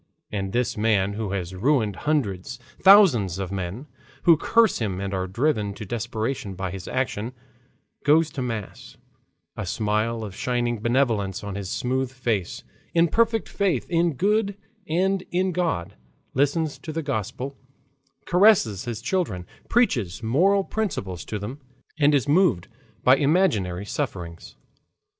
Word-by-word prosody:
And 95 -2 -3
this 120 +1 0
man 105 -2 +2
who 105 -2 -3
has 90 -2 -3
ruined 110 0 +1
hundreds, 105 -12 -1 0.2
thousands 160 - +6
of 95 -1 -4
men, 100 +7 -4 0.4
who 170 - +7
curse 225 +8 +3
him 100 -5 -2
and 100 0 -3
are 95 -1 -1
driven 105 -1 0
to 110 - -7
desperation 115 0 -3
by 95 0 -4
his 95 -1 -7
action, 125 -2 -2 0.7
goes 155 +2 +4
to 135 - -5
mass, 115 -5 -6 0.6
a - - -4
smile 110 +2 -1
of 100 -3 -7
shining 120 -1 -1
benevolence 115 -5 0
on 100 -1 -5
his 100 -1 -5
smooth 130 +3 -1
face, 115 -8 -2 0.3
in 170 0 +4
perfect 225 +1 +2
faith 200 -3 0
in 170 -1 +2
good 200 - +1 0.3
and 190 +4 +1
in 185 +1 +1
God, 160 - -1 0.4
listens 145 +3 0
to 160 - -7
the 160 +1 -3
Gospel, 130 +1 -3 0.7
caresses 180 - +4
his 115 -2 -5
children, 125 - -1 0.2
preaches 120 - +1
moral 185 - +3
principles 145 - -3
to 105 - -4
them, 120 +8 -7 0.4
and 145 0 +5
is 140 0 +1
moved 150 - +3 0.4
by 130 +2 +6
imaginary 140 - +1
sufferings. 90 - -5
120 Hz, 140 wpm, -24 LUFS, 100-160 Hz, 0.7 s, who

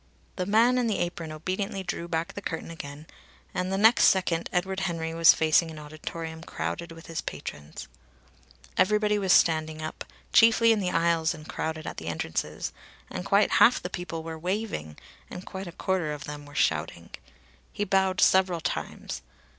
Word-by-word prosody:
The 180 -1 -3
man 235 +5 +4
in 245 - +1
the 215 - 0
apron 175 -2 -3
obediently 190 +5 -3
drew 175 -1 -4
back 165 0 -2
the 200 - -6
curtain 165 -3 -5
again, 145 -2 -8 0.5
and 180 +1 -2
the 195 - 0
next 225 +5 +6
second 175 -3 +2
Edward 190 +2 -1
Henry 165 -4 -2
was 165 0 +7
facing 160 +1 +3
an 160 - -9
auditorium 160 +2 -7
crowded 170 0 -4
with 165 0 -11
his 165 - -4
patrons. 75 +1 -7 0.9
Everybody 210 +2 +3
was 190 -2 +1
standing 155 -2 +3
up, 155 0 -5 0.3
chiefly 230 0 +6
in 220 - +3
the 185 -3 0
aisles 170 -1 +2
and 155 -1 -12
crowded 160 0 -4
at - - -6
the 80 - -7
entrances, 80 -1 -3 0.4
and - - -4
quite - - +3
half - - +7
the - - -6
people 170 -2 -5
were 160 0 -6
waving, 180 - -3 0.3
and 180 - -8
quite 190 -1 -6
a - - -6
quarter 175 -3 -1
of 150 +1 -7
them 150 -2 -8
were 145 - -14
shouting. 85 - 0 0.6
He 205 - -2
bowed 190 -1 +2
several 185 -2 +4
times. 110 - -4
170 Hz, 175 wpm, -27 LUFS, 155-190 Hz, 0.9 s, was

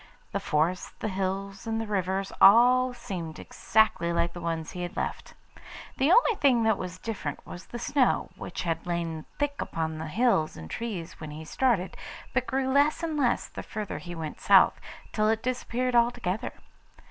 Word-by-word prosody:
The - - -1
forests, 165 +4 0
the 215 - -3
hills, 195 +1 -3
and 225 0 -1
the 225 - -2
rivers 195 -1 -1
all 250 +5 +7
seemed 180 -10 -6
exactly 195 -5 +1
like 170 0 0
the 175 - -7
ones 165 -1 -3
he 180 - -6
had 175 0 -5
left. - - -4 0.6
The 270 +3 +3
only 475 +4 +6
thing 255 -5 +4
that 220 0 +2
was 185 0 -5
different 225 +2 -5
was 180 - -10
the 240 - -6
snow, 255 +2 +1
which - - -6
had 165 0 -2
lain 165 -2 -2
thick 290 -1 -1
upon 160 -1 -3
the 160 - -4
hills 195 -3 +1
and 80 0 -9
trees 205 -8 -5
when 155 - -7
he 155 +2 -8
started, 215 -2 +1 0.4
but 255 0 0
grew 265 0 0
less 290 +4 +3
and 320 -2 -1
less 255 -5 +1
the - - -7
farther 210 -1 -5
he 175 -1 -8
went 160 -2 -6
south, - - +5 0.3
till 215 0 +2
it 225 0 0
disappeared 250 0 -1
altogether. 235 -5 +1
200 Hz, 180 wpm, -28 LUFS, 170-245 Hz, 0.6 s, all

